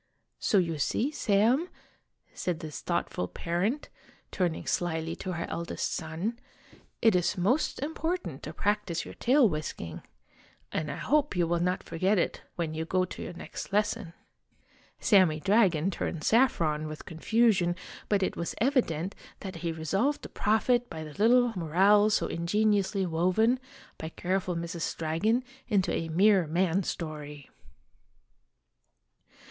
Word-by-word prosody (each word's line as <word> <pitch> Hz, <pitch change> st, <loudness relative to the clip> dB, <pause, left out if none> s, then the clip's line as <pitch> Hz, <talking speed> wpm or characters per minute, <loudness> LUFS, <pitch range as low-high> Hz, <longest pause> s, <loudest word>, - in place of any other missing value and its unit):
So 205 Hz, -, +2 dB
you 165 Hz, -4 st, +1 dB
see, 245 Hz, -, 0 dB
Sam," 240 Hz, -, +2 dB, 0.6 s
said 175 Hz, -3 st, -2 dB
this 155 Hz, -2 st, -7 dB
thoughtful 90 Hz, -, -2 dB
parent, 180 Hz, -, -2 dB, 0.4 s
turning 175 Hz, -4 st, -1 dB
slyly 165 Hz, -1 st, -1 dB
to 185 Hz, -, -4 dB
her 170 Hz, -1 st, -3 dB
eldest 170 Hz, 0 st, -3 dB
son, 175 Hz, +9 st, -3 dB, 0.6 s
"it 225 Hz, -4 st, +6 dB
is 180 Hz, +3 st, +1 dB
most 210 Hz, -, +1 dB
important 325 Hz, +4 st, -3 dB
to -, -, -6 dB
practise 205 Hz, -5 st, -1 dB
your -, -, -9 dB
tail 260 Hz, 0 st, +4 dB
whisking 150 Hz, -, -4 dB, 0.7 s
and 155 Hz, -1 st, -2 dB
I -, -, -4 dB
hope 295 Hz, -4 st, +1 dB
you 175 Hz, -1 st, +2 dB
will 170 Hz, +1 st, 0 dB
not 180 Hz, +2 st, 0 dB
forget 185 Hz, +5 st, +1 dB
it 175 Hz, -, 0 dB
when 165 Hz, -3 st, -2 dB
you 160 Hz, +1 st, -2 dB
go 185 Hz, +3 st, +1 dB
to -, -, -9 dB
your -, -, -6 dB
next 175 Hz, -, -8 dB
lesson." 210 Hz, -3 st, 0 dB, 0.9 s
Sammy 185 Hz, -7 st, +4 dB
Dragon 195 Hz, -3 st, +3 dB
turned 165 Hz, -3 st, -3 dB
saffron 165 Hz, -, +2 dB
with 155 Hz, -1 st, -8 dB
confusion, 185 Hz, +1 st, +2 dB, 0.3 s
but 200 Hz, -2 st, +2 dB
it -, -, -1 dB
was 170 Hz, -, -3 dB
evi 255 Hz, +3 st, +4 dB
dent 165 Hz, +4 st, -4 dB, 0.3 s
that 190 Hz, -3 st, -6 dB
he 165 Hz, 0 st, -2 dB
resolved 195 Hz, -, 0 dB
to -, -, -7 dB
profit 240 Hz, +3 st, +1 dB
by 160 Hz, -, -6 dB
the 155 Hz, -1 st, -9 dB
little 240 Hz, +4 st, +4 dB
moral 195 Hz, +5 st, +4 dB
so 210 Hz, -, +2 dB
ingeniously 200 Hz, +2 st, +1 dB
woven, 185 Hz, +9 st, +2 dB, 0.4 s
by 160 Hz, -, -5 dB
careful 185 Hz, +1 st, -1 dB
Mrs. 170 Hz, 0 st, -3 dB
Dragon, 170 Hz, +10 st, +1 dB, 0.2 s
into 200 Hz, -5 st, +2 dB
a 165 Hz, -, -2 dB
mere 190 Hz, +1 st, +4 dB
man 180 Hz, +3 st, +1 dB
story. 150 Hz, -5 st, -6 dB
185 Hz, 140 wpm, -29 LUFS, 165-215 Hz, 0.9 s, it